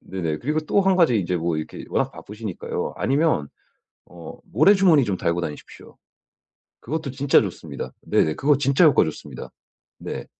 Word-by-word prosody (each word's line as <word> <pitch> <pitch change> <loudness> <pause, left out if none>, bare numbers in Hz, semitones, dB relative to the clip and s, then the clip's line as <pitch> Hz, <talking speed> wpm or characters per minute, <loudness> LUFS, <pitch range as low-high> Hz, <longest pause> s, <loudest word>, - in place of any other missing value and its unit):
네네 85 -5 -4
그리고 150 - -1
또 155 +6 +1
1 190 -1 +3
가지 160 -11 +4
인제 90 -2 -1
뭐 85 -1 -1
이렇게 80 - -6
워낙 - - 0
바쁘시니까요. 105 -2 -6
아니면 140 - +1 0.6
어 85 -1 -11
모래 155 - +4
주머니 175 -8 +4
좀 100 -4 -2
달고 85 +1 -1
다니십시오. 75 -3 -9 0.8
그것도 155 +2 -4
진짜 140 +1 +3
좋습니다. - - -7
네네 80 - +1
그거 145 0 +3
진짜 140 +4 +3
효과 155 - +5
좋습니다. 80 - -8 0.5
네. - - -6
130 Hz, 350 characters per minute, -23 LUFS, -, 0.8 s, 효과